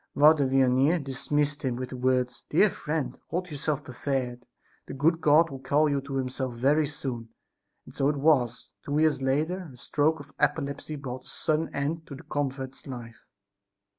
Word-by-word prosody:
Father 145 -1 +6
Vianney 135 +4 +4
dismissed 145 +2 -1
him 130 -3 0
with 125 +1 -4
the 130 - -6
words; 125 -1 0
"Dear 195 +6 +4
friend, 150 -6 -3
hold 180 0 -3
yourself 150 0 -2
prepared; 125 -1 -3 0.4
the - - -6
good 165 +4 +2
God 155 +1 +5
will 135 - -6
call 140 +4 +2
you 140 -1 0
to 140 0 -6
Himself 130 -1 -2
very 145 +5 +3
soon!" 130 -6 -5 0.6
And - - -13
so 135 - +2
it 150 - 0
was. 135 -5 +2
Two 145 +1 -1
years 155 -3 +3
later 155 +7 0
a 125 - -14
stroke 150 +5 +1
of 145 -1 -12
apoplexy 145 0 -1
brought 130 -3 -6
to - - -21
a - - -11
sudden 155 +1 -1
end 150 +4 -1
the 140 - -7
convert's 135 -3 -4
life. 120 -3 -9
140 Hz, 175 wpm, -27 LUFS, 130-150 Hz, 0.6 s, Father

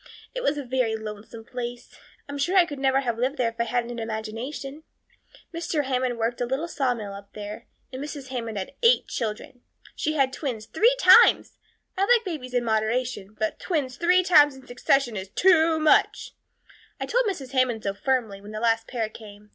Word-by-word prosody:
It - - -4
was 300 - 0
a 290 - -3
very 245 -3 0
lonesome 220 +1 -8
place. 245 0 -7 0.3
I'm 285 0 -6
sure 350 +7 +1
I 360 - +7
could 290 -4 -7
never 270 0 +2
have 235 -3 -2
lived 260 +4 0
there 240 -2 +1
if 230 0 -16
I 235 - +2
hadn't 240 0 -1
had 240 - -6
an 230 - -3
imagination. 235 +6 -6 0.7
Mr. 330 -2 -1
Hammond 255 -2 -1
worked 230 +2 -2
a 245 - 0
little 270 +7 -2
sawmill 245 -10 -2
up 200 0 -11
there, 210 +2 -8 0.3
and 260 +2 -5
Mrs. 285 -3 -7
Hammond 230 -4 -4
had 190 +5 -5
eight 475 +1 +4
children. 230 +2 -5 0.3
She 310 - -1
had 270 -3 +1
twins 245 -8 -4
three 450 - +3
times. - - +6 0.4
I 390 0 +2
like 475 -2 +4
babies 265 -9 -5
in 245 - +2
moderation, 220 -1 -1
but 215 0 -2
twins 285 -8 -2
three 360 +1 +3
times 295 -6 +5
in 265 -1 -14
succession 250 -1 +1
is 190 -1 -5
too 330 - +4
much. 310 -1 +2 0.7
I - - -2
told - - +1
Mrs. 280 -10 -4
Hammond 255 -4 +1
so 200 - -1
firmly, 220 -3 -1
when 205 +1 -11
the 215 - -4
last 225 0 +1
pair 230 -4 -2
came. 210 -1 -13
250 Hz, 195 wpm, -25 LUFS, 225-290 Hz, 0.7 s, I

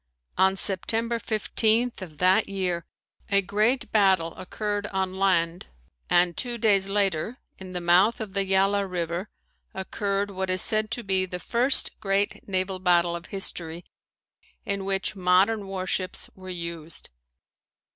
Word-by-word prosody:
On 190 0 +3
September 225 +5 0
15th 225 +1 +1
of 160 -5 -9
that 185 +3 +3
year 180 -4 -2 0.4
a 200 - +4
great 215 +7 +1
battle 190 -6 +3
occurred 205 +2 -3
on 190 -2 -2
land 175 -3 +1 0.4
and 175 -1 +4
two 240 -2 -2
days 200 -4 +2
later, 200 +2 0 0.2
in 185 -1 -9
the 180 - -3
mouth 180 +6 +4
of 215 -4 -6
the 200 -1 +1
Yala 195 +1 +2
River 175 +2 -3 0.5
occurred 200 +1 -2
what 190 -1 -3
is 185 0 +2
said 215 0 +2
to 235 +1 -4
be 190 -1 +1
the 180 - -4
first 245 +8 0
great 200 0 -1
naval 185 0 -1
battle 175 -2 +3
of 170 0 -8
history 175 -3 -4 0.8
in 200 -1 -2
which 195 +1 -1
modern 195 +3 +3
warships 185 -1 -2
were 185 0 -11
used. 170 - -6
190 Hz, 140 wpm, -26 LUFS, 180-205 Hz, 0.8 s, a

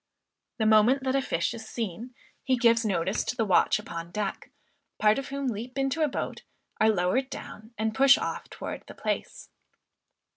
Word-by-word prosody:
The 220 - 0
moment 220 +5 +5
that 260 0 0
a 275 - +3
fish 250 - -1
is 225 -2 -8
seen, 230 +2 -5 0.3
he 260 -1 +2
gives 235 -1 +4
notice 190 -2 0
to - - -3
the 225 -3 0
"watch 190 -4 +4
upon 165 0 -7
deck," 200 +1 -4 0.5
part 215 +3 +4
of 275 - -6
whom 275 0 -4
leap 245 +2 -4
into 270 +3 0
a 305 - +4
boat, 275 - -4 0.4
are 220 - +5
lowered 215 +7 +1
down, 225 -4 -9
and 220 +1 -1
push 275 +4 +6
off - - -4
towards - - -7
the - - -11
place. - - -4
230 Hz, 180 wpm, -27 LUFS, 210-260 Hz, 0.5 s, push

